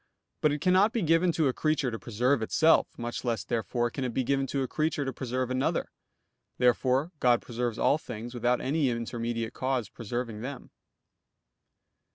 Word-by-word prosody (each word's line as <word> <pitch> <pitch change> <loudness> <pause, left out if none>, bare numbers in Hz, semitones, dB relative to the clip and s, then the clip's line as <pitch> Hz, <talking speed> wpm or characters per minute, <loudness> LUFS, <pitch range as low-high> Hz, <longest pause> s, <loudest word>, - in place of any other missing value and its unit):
But 150 - +4
it 145 0 -2
cannot 190 +5 +4
be 230 -5 0
given 165 +2 +3
to 160 -3 +2
a 130 - +1
creature 150 -4 0
to 115 - -5
preserve 125 +3 +1
itself; 160 +8 +4
much 120 0 -4
less 120 -3 -1
therefore 120 +1 -1
can 135 - -4
it 125 -2 -3
be 130 - +1
given 135 +2 0
to 135 +1 -1
a - - -2
creature 155 -1 -1
to 135 - -3
preserve 130 0 -2
another. 130 +1 0 0.7
Therefore 130 +5 +2
God 120 -1 +4
preserves 120 -1 -3
all 150 - +3
things 120 -3 -7
without 120 0 +1
any 140 0 +1
intermediate 115 -1 -3
cause 130 -3 -1
preserving 115 -1 -5
them. 135 +2 -7
125 Hz, 175 wpm, -28 LUFS, 120-145 Hz, 0.7 s, But